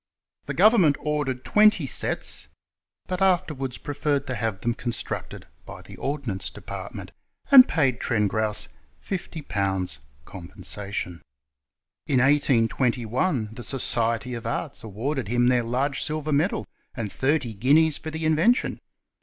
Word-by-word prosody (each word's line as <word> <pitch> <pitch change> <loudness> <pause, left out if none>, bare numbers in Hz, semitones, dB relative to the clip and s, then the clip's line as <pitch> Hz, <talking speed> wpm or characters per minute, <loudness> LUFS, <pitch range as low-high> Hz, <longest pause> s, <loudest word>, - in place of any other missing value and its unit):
* - - -51
The - - -3
government 195 -10 +5
ordered 145 -4 -2
twenty 210 -6 +4
sets, - - -2 0.6
but 185 0 -4
afterwards 155 -9 +1
preferred 145 0 -1
to 130 - -3
have 110 -4 -3
them 120 - 0
constructod 120 0 -5 0.2
by - - -11
the - - -12
ordnance 130 -10 -3
department, - - -8 0.4
and 265 -2 +10
paid 135 -7 +1
Trengrouse 105 -1 0 0.4
50/. 100 - -2 0.3
compensation. 95 -1 -6 0.9
In 135 - +2
1821 125 - +1
the 120 - -8
Society 120 -2 +1
of 115 -1 -5
Arts 140 +5 -4
awarded 115 +4 -3
him 120 +2 +2
their 125 -1 +3
large 130 +4 -1
silver 155 -1 -1
medal 155 +7 +1 0.3
and 110 -5 -4
thirty 135 -4 0
guineas 145 +8 +3
for 160 - -6
the 160 0 -4
invention. 165 +11 +2
130 Hz, 125 wpm, -25 LUFS, 115-155 Hz, 0.9 s, and